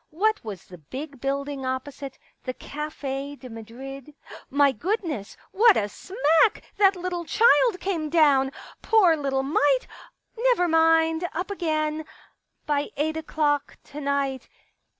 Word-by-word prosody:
What 430 +7 0
was 205 -6 -7
the 180 -1 -13
big 275 - -8
building 280 0 -2
opposite 260 +1 -5
— - - -44
the 255 -1 -4
Cafe 285 -2 -5
de 260 -2 -11
Madrid? 265 +6 -9 0.3
My 280 0 +4
goodness, 320 - -3
what 435 +2 +5
a 205 - +1
smack 325 - +2
that 390 -1 +5
little 355 -1 -3
child 460 +2 +4
came 335 -6 -2
down 290 -5 +4
I - - -7 0.3
Poor 385 -7 +4
little 275 -3 -1
mite! 280 -1 +2 0.5
Never 475 -6 +2
mind 325 +1 +3
— - - -22
up 360 +5 -3
again.... 310 -4 -1 0.6
By 290 -1 0
eight 315 +2 0
o'clock 300 -2 -1
to 295 +1 -9
night 275 -2 -1
295 Hz, 140 wpm, -25 LUFS, 270-345 Hz, 0.6 s, what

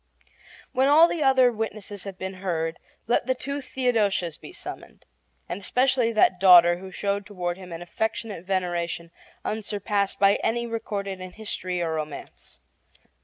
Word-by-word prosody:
When 265 +1 +2
all 310 +4 +7
the 340 - -3
other 265 -3 +5
witnesses 215 -3 -5
have 195 -2 -7
been 190 -1 -6
heard, 165 -3 -2 0.3
let 240 - +1
the 260 - +2
two 280 +2 -4
Theodosias 215 - 0
be - - -12
summoned, - - -10 0.4
and 180 +3 -5
especially 250 +3 +2
that 190 -4 +4
daughter 175 -2 +8
who 190 0 -9
showed 200 +1 -2
toward 180 -4 -3
him 180 -2 -10
an 165 +1 -6
affectionate 220 0 -3
veneration 175 -3 -2 0.3
unsurpassed 205 -2 -1
by 200 0 +5
any 235 +1 -1
recorded 205 -4 -4
in 185 -1 -8
history 185 -5 -3
or 165 -1 -1
romance. 150 - -7
200 Hz, 150 wpm, -25 LUFS, 180-230 Hz, 0.4 s, daughter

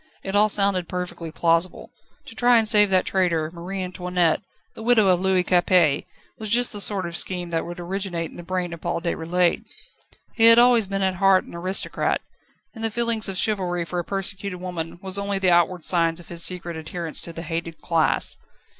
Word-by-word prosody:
It 195 +1 -4
all 210 +1 +4
sounded 195 -4 +1
perfectly 180 -3 -5
plausible. 165 +2 0 0.3
To 260 - -11
try 245 +1 +4
and 220 -1 +3
save 210 -2 +5
that 185 -1 +2
traitor, 170 -5 0
Marie 185 +3 -5
Antoinette, 180 -2 -1 0.3
the - - -11
widow 220 -4 +4
of 180 -1 +3
Louis 190 -1 +2
Capet, 175 -4 +2 0.3
was 215 -1 -5
just 240 +2 +1
the 205 - -1
sort 195 -2 +1
of 170 0 -6
scheme 175 -1 -1
that 165 0 -2
would 175 0 -8
originate 175 -2 -4
in - - -15
the - - -8
brain 180 0 -3
of 165 - -10
Paul 170 - -2
Déroulède. 170 +1 0 0.7
He 225 - +3
had 230 0 +9
always 240 -3 +5
been 195 0 -2
at 190 -1 0
heart 195 0 +4
an - - -14
aristocrat, 185 +3 -1 0.5
and 225 -2 -9
the 225 - +2
feeling 230 0 +1
of 195 -1 -3
chivalry 180 -5 -1
for 175 +1 -4
a - - -2
persecuted 195 -1 -3
woman 175 -2 -6
was 190 +1 0
only 200 0 -1
the 190 -2 +2
outward 175 0 +2
signs 165 -1 +2
of 175 - -15
his 170 -1 -2
secret 175 -2 -1
adherence 160 +1 -4
to 170 - -4
the 165 0 -8
hated 165 0 -5
class. 165 -3 +1
180 Hz, 200 wpm, -23 LUFS, 170-200 Hz, 0.7 s, had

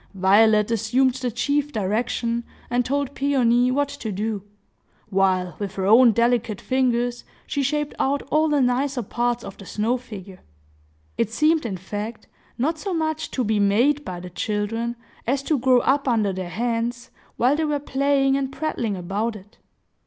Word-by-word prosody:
Violet 210 +3 +4
assumed 245 +4 +2
the 255 -1 -3
chief 290 +5 0
direction, 230 +2 -1 0.3
and 245 0 +2
told 280 +2 -1
Peony 250 -4 +2
what 285 +2 +1
to 280 -6 -6
do, 210 +1 -2 0.7
while, 185 -2 +1
with 200 -2 -4
her 190 - -2
own 230 +4 +7
delicate 235 -2 +1
fingers, 245 -2 0 0.2
she 285 - -2
shaped 295 +2 -1
out 280 +1 +1
all 310 +1 +3
the 295 -2 +2
nicer 255 +1 +1
parts 240 +2 -1
of 195 - -9
the 195 - -10
snow 225 +4 0
figure. 200 -6 -10 0.8
It 230 - +2
seemed, 305 +4 +2
in 190 -4 -4
fact, 210 +5 -6 0.3
not 310 +6 0
so 390 -1 -3
much 315 -1 -1
to 255 - -1
be 215 -1 +1
made 240 +9 +3
by 180 -7 -6
the 180 0 -9
children, 215 +5 -2 0.3
as 270 +2 0
to 295 -1 +1
grow 255 0 +4
up 275 +1 +1
under 215 -5 +2
their 185 -1 -5
hands, 235 +4 -2 0.3
while 255 +4 +3
they 315 +1 0
were 300 -1 0
playing 275 -1 +1
and 270 -1 -1
prattling 260 -9 -2
about 200 +6 -2
it. 205 +1 -14
240 Hz, 165 wpm, -23 LUFS, 210-275 Hz, 0.8 s, own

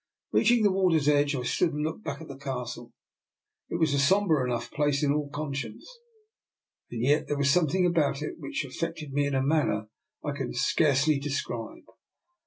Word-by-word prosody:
Reaching 235 0 +4
the 205 - +4
water's 180 -6 +2
edge, 145 0 +3
I 125 - -3
stood 165 +6 +1
and 150 0 -2
looked 160 +7 -4
back 140 -3 -5
at - - -9
the 140 - -8
Castle. 125 -3 -6 0.8
It - - -3
was 160 -4 +2
a 140 - +2
sombre 165 -1 +3
enough 120 -2 -3
place 145 -1 +1
in 145 -1 +3
all 150 -1 -2
con 145 -1 -4
science, 140 - -6 1.0
and 115 -1 -4
yet 145 +4 +2
there 145 - -1
was 140 0 +3
something 180 +3 +2
about 150 -4 +1
it - - -2
now - - -7
which 280 -2 -3
affected 165 -4 -5
me 145 0 +1
in 140 - -1
a 130 - +1
manner 135 -8 +1 0.4
I 145 - -1
can 135 -4 -4
scarcely 145 +2 +2
describe. 135 -5 -4
145 Hz, 190 wpm, -28 LUFS, 135-160 Hz, 1.0 s, Reaching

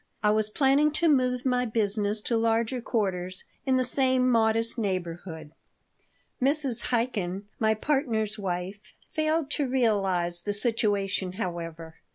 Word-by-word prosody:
I 210 - +4
was 215 0 +2
planning 275 +5 +3
to 335 +2 +1
move 255 -4 +2
my 250 -1 +2
business 210 -2 0
to 235 - -1
larger 230 +2 +1
quarters, 185 -5 -2 0.2
in 260 -1 +3
the 255 - +1
same 260 -1 +4
modest 225 0 +2
neighborhood. 175 -5 -4 0.9
Mrs. 270 -3 +1
Chaikin, 210 -6 -1 0.2
my 220 -1 +2
partner's 220 -5 0
wife, 190 +2 -5 0.2
failed 310 -2 0
to 290 -2 0
realize 195 -9 +1
the 205 +3 -2
situation, 205 -4 0
however. 165 -4 -6
220 Hz, 130 wpm, -27 LUFS, 195-255 Hz, 0.9 s, I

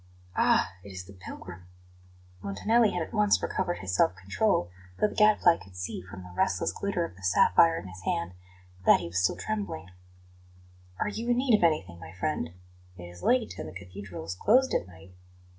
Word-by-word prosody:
"Ah, - - +3
it 100 - -10
is 95 -1 -7
the 100 - -13
pilgrim?" 90 -1 -10 0.7
Montanelli 210 - +2
had 180 -3 -2
at - - -10
once 210 -2 +4
recovered 175 - -2
his 95 -1 -4
self 90 - +3
control, 90 - 0 0.3
though - - +3
the - - -8
Gadfly 210 -5 +5
could 95 -1 -15
see, 90 0 -4
from 95 0 -10
the 90 -1 -12
restless 95 0 +1
glitter 200 -4 -2
of 95 - -10
the 95 - -16
sapphire 95 - +4
on - - -10
his 95 +1 -10
hand, 85 0 -2 0.5
that - - +6
he 90 - -6
was 90 +2 -1
still - - +2
trembling. 200 - -4 1.1
"Are - - 0
you 230 +3 -4
in 240 - +3
need 255 -1 +2
of 210 - 0
anything, 95 - +1
my 90 - -10
friend? 125 - -2 0.5
It 90 - -9
is 90 0 -11
late, 245 -2 +1
and - - -5
the - - -12
Cathedral 95 -2 -9
is 85 - -3
closed 250 - +3
at 90 - 0
night." 90 +1 -15
95 Hz, 195 wpm, -28 LUFS, -, 1.1 s, that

